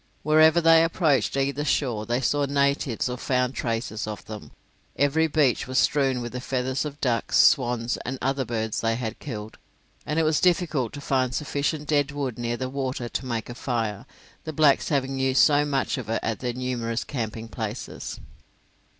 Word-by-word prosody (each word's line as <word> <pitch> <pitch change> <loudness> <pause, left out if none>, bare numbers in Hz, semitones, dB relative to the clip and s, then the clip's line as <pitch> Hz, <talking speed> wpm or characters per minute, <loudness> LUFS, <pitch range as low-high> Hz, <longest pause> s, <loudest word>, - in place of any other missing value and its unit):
Wherever 155 +2 +5
they 165 0 +6
approached 160 -5 +1
either 140 +1 0
shore, 120 -7 0
they 120 +2 0
saw 145 +2 +1
natives 140 -4 +1
or 125 0 -4
found 125 -1 0
traces 115 -3 -3
of 105 -1 -6
them. 110 -1 -8 0.5
Every 150 +3 +2
beach 145 -6 +2
was 130 0 -2
strewn 135 -3 +2
with 120 - -5
the 125 - -5
feathers 130 +1 -1
of 145 -2 -5
the - - -33
ducks, 120 -4 +1
swans, 120 -2 +3
and 130 +2 -5
other 135 +1 0
birds 110 -3 -2
they 115 0 +1
had 115 -2 -4
killed, 110 -6 -7 0.4
and 150 - -3
it 165 - +3
was 155 -1 +2
difficult 165 -9 +1
to 145 - -7
find 130 -2 0
sufficient 150 0 -2
dead 145 -2 +2
wood 140 -4 -4
near 120 0 -2
the 130 - -3
water 130 -2 -3
to 130 - -4
make 115 -3 -3
a 120 - -6
fire, 115 -5 -3 0.4
the 155 - -5
blacks 150 -2 +3
having 135 -2 0
used 130 0 +4
so 145 -1 +4
much 135 -2 -1
of 120 - -7
it 115 - 0
at 115 -2 -2
their 125 -2 -2
numerous 120 -2 -2
camping 115 -4 -5
places. 110 0 -6
130 Hz, 185 wpm, -25 LUFS, 120-145 Hz, 0.5 s, they